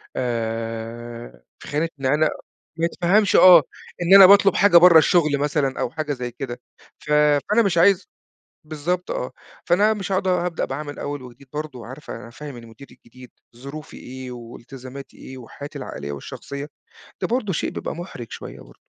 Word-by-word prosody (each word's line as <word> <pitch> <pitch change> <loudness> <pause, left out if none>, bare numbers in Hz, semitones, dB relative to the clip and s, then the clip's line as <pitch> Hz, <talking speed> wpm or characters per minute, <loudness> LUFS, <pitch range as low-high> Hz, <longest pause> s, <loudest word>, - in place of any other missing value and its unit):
آآ، 115 - -5 0.2
في - - -12
خانة 155 +3 -1
إن 135 - -5
أنا 150 +4 +3 0.5
ما 165 - +2
يتفهَمش 185 +4 +2
آه، 180 -4 +8 0.4
إن 175 +3 +6
أنا 195 -1 +11
باطلُب 200 0 +6
حاجة 200 -4 +6
برّه 170 -1 +8
الشغل 155 -3 +3
مثلًا 145 -1 -1
أو - - -1
حاجة 150 +1 -3
زي 125 -2 -5
كده، 120 0 -7 0.4
ف 150 - -8
فأنا 150 +8 +3
مش 180 -4 0
عايز 185 +2 +4 0.6
بالضبط 170 +4 -3
آه، 125 - -4 0.3
فأنا 205 +5 +3
مش 195 -2 -5
هاقعُد 190 0 0
هابدأ 180 -2 0
بقى 135 +3 -5
من 145 -1 -8
أول 145 -1 -5
وجديد 125 +2 -14
برضه، 150 -3 -6
وعارفة 120 0 -9
هافهِّم 140 +3 -10
المدير 115 +3 -13
الجديد 125 -1 -16 0.3
ظروفي 140 +5 -10
إيه 130 0 -9
وإلتزاماتي 125 +3 -11
إيه 130 - -11
و 120 -3 -12
حياتي 145 0 -9
العائلية 70 +1 -7
والشخصية، 140 - -8 0.5
ده - - +1
برضه 230 -5 -1
شيء 155 - -2
بيبقى - - -5
مُحرِج 150 - -8
شوية - - -9
برضه. - - -18
145 Hz, 170 wpm, -22 LUFS, 125-175 Hz, 0.6 s, أنا